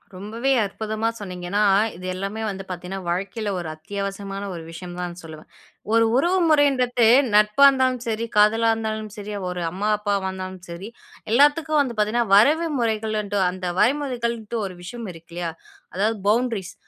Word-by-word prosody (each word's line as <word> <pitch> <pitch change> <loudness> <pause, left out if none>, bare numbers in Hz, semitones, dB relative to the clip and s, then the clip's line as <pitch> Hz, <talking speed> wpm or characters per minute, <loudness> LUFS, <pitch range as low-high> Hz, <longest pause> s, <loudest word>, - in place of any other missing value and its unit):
ரொம்பவே 225 +8 -2
அற்புதமா 220 +2 -3
சொன்னீங்க. 180 -4 -7
ஏன்னா, 205 +1 +2 0.3
இது 185 +1 -9
எல்லாமே 195 +4 -4
வந்து 195 -1 -5
பாத்தீங்கன்னா 185 +2 -5
வாழ்க்கையில 200 +5 -2
ஒரு 170 - -5
அத்தியாவசியமான 200 +3 -5
ஒரு 170 - -6
விஷயம் 175 +1 -8
தான் 175 -1 -4
சொல்லுவேன். 160 0 -11 0.4
ஒரு 230 0 +5
உறவு 350 +7 +2
முறைன்றது 255 -6 +3 0.3
நட்பு 210 +5 +4
இருந்தாலும் 260 -2 +4
சரி, 225 0 -1
காதலா 225 +2 +4
இருந்தாலும் 220 -1 -4
சரி, 210 0 -6 0.2
ஒரு 180 -1 -4
அம்மா, 205 +4 -2
அப்பாவா 205 -2 -1
வந்தாலும் 185 -1 -7
சரி, 175 +5 -7 0.4
எல்லாத்துக்கும் 295 +4 +4
வந்து 245 -4 -2
பாத்தீங்கன்னா 215 +1 +1
வரைவு 305 +10 +5
முறைகள்ன்ற, 215 -3 -1
அந்த 185 0 -7
வரைமுறைகள்ன்டு 235 -5 0
ஒரு 185 -2 -7
விஷயம் 230 +1 -7
இருக்கு 165 +1 -16
இல்லயா! 175 -1 -3 0.4
அதாவது 215 +4 +1
பவுண்ட்ரீஸ் 225 -4 0
210 Hz, 150 wpm, -23 LUFS, 190-235 Hz, 0.4 s, ஒரு